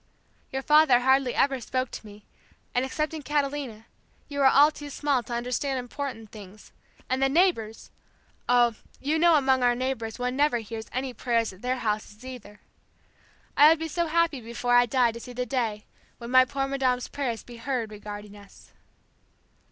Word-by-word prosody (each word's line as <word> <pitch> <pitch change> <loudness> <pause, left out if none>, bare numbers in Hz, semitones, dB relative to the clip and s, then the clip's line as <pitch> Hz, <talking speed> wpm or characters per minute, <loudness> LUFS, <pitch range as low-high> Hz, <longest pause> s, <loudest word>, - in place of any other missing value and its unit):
Your 265 0 -3
father 300 -5 +5
hardly 265 0 +2
ever 270 -2 +1
spoke 255 +2 -2
to - - -8
me, 205 0 -14 0.5
and 250 - +1
excepting 305 +4 -3
Catalina, 275 -6 -2 0.4
you 285 -1 -5
were 275 - +6
all 285 +3 +6
too 295 -1 -9
small 285 -2 0
to 240 +1 -8
understand 250 +3 -2
important 245 -3 -6
things, 210 -1 -13 0.4
and 260 +1 -1
the 270 - +3
neighbors! 275 - 0 0.6
Oh, 240 -1 +4 0.3
you 305 +4 0
know 340 0 +5
among 265 -3 +3
our 245 -1 +3
neighbors 245 -3 -3
one 250 0 -2
never 290 -2 +2
hears 225 0 -7
any 255 0 -3
prayers 230 -4 -1
at 185 - -17
their 255 +1 -1
houses 215 0 -4
either. 245 -5 -10 0.9
I 295 +1 +8
would 325 - +4
be 325 +1 -4
so 340 +2 -1
happy 325 -4 +1
before 235 +2 -2
I 245 0 +6
die 245 -1 +2
to 230 - -9
see 245 +1 -10
the 250 +1 -3
day 230 -6 -2 0.3
when 235 0 -8
my 255 0 +7
poor 275 +1 -2
madame's 260 -2 0
prayers 250 -6 -4
be 240 -1 -12
heard 230 -2 -3
regarding 210 0 -9
us." 200 -1 -17
255 Hz, 175 wpm, -26 LUFS, 230-275 Hz, 0.9 s, I